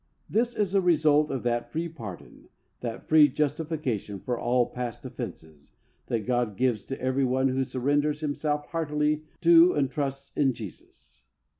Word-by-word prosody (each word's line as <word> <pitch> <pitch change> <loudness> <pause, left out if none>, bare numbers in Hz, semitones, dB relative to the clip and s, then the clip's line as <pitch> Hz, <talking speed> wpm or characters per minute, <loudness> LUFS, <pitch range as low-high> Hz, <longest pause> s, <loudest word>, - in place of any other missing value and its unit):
This 235 +2 0
is 200 -3 0
a 195 - +4
result 155 -3 +3
of 135 - -3
that 120 0 -1
free 165 +2 -2
pardon, 115 - -10 0.3
that 115 -2 -6
free 155 -1 +7
justification 145 -8 -2
for 125 +5 -2
all 120 +1 +2
past 125 -2 -5
offences', 75 -2 -8 0.3
that 115 -3 -2
God 120 -5 0
gives 120 -4 +1
to 135 - -5
every 130 +1 0
one 130 +1 +2
who 130 +1 0
surrenders 145 +4 0
himself 150 0 -1
heartily 150 -1 0 0.2
to 170 +1 +7
and 135 -3 0
trusts 140 0 -3
in 135 -3 +2
Jesus. 100 - -12
140 Hz, 155 wpm, -27 LUFS, 120-155 Hz, 0.3 s, free